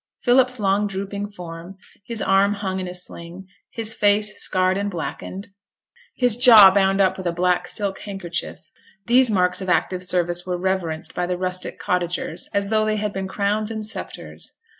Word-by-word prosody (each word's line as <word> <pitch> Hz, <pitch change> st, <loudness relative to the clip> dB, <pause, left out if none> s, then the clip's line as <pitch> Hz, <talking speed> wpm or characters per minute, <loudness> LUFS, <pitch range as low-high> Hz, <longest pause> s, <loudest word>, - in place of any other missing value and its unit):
Philip's 250 Hz, 0 st, +3 dB
long 200 Hz, +1 st, +1 dB
drooping 200 Hz, +1 st, -5 dB
form, 175 Hz, -1 st, -10 dB, 0.3 s
his 230 Hz, -2 st, -2 dB
arm 195 Hz, +1 st, +3 dB
hung 190 Hz, -2 st, -3 dB
in 185 Hz, -, -4 dB
a 180 Hz, -, -6 dB
sling, 180 Hz, +1 st, -6 dB, 0.2 s
his 225 Hz, -1 st, -3 dB
face 210 Hz, 0 st, +2 dB
scarred 185 Hz, 0 st, +1 dB
and 200 Hz, +1 st, -2 dB
blackened, 190 Hz, +3 st, -6 dB, 0.7 s
his 245 Hz, -3 st, +3 dB
jaw 225 Hz, -6 st, +9 dB
bound 195 Hz, 0 st, +2 dB
up 190 Hz, -1 st, +2 dB
with 190 Hz, -2 st, -4 dB
a -, -, +1 dB
black 180 Hz, +1 st, 0 dB
silk 200 Hz, -2 st, -2 dB
handkerchief; 185 Hz, -4 st, -6 dB, 0.4 s
these 245 Hz, +2 st, +4 dB
marks 180 Hz, -2 st, +1 dB
of 190 Hz, -, -4 dB
active 180 Hz, 0 st, 0 dB
service 175 Hz, -1 st, 0 dB
were 180 Hz, -1 st, -3 dB
reverenced 175 Hz, -4 st, -2 dB
by 180 Hz, -, -2 dB
the 180 Hz, 0 st, -2 dB
rustic 185 Hz, 0 st, -4 dB
cottagers 175 Hz, -1 st, -3 dB
as 200 Hz, 0 st, 0 dB
though 215 Hz, 0 st, +2 dB
they 215 Hz, 0 st, 0 dB
had 210 Hz, -1 st, -3 dB
been 190 Hz, 0 st, -4 dB
crowns 205 Hz, +2 st, -1 dB
and 220 Hz, -1 st, -5 dB
sceptres. 215 Hz, -, -7 dB
195 Hz, 175 wpm, -22 LUFS, 180-210 Hz, 0.7 s, jaw